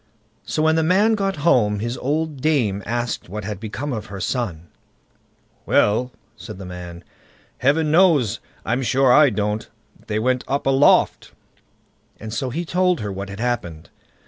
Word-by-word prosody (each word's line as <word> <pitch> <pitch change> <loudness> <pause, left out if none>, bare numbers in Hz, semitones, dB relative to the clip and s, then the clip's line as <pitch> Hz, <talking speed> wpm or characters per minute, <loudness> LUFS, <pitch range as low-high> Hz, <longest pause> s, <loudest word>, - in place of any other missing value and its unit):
So 155 - -1
when 160 0 +3
the - - +3
man 190 +7 +3
got 195 -2 -1
home, 105 -9 +3
his 120 +4 -3
old 150 0 -2
dame 120 -11 +1
asked 120 -4 -3
what 105 +2 -5
had 100 -1 -5
become 120 +6 -5
of 110 -2 -5
her 100 -1 -8
son. 95 -8 -3 1.0
"Well", 120 +5 +2 0.2
said 110 -5 -9
the 95 - -8
man, 90 -1 -9 0.6
"Heaven 150 +3 +2
knows, 160 - +3 0.3
I'm 120 +5 0
sure 130 +1 +3
I 150 0 +6
don't. 105 0 -2 0.4
They 105 - -1
went 125 +3 0
up 140 +1 -1
aloft"; 135 +1 +3 0.9
and 110 0 -7
so 130 +3 -2
he 170 +8 -3
told 180 -1 +1
her 105 -1 -3
what 100 +1 -6
had 100 +1 -8
happened. 110 -10 -3
120 Hz, 160 wpm, -21 LUFS, 105-150 Hz, 1.0 s, I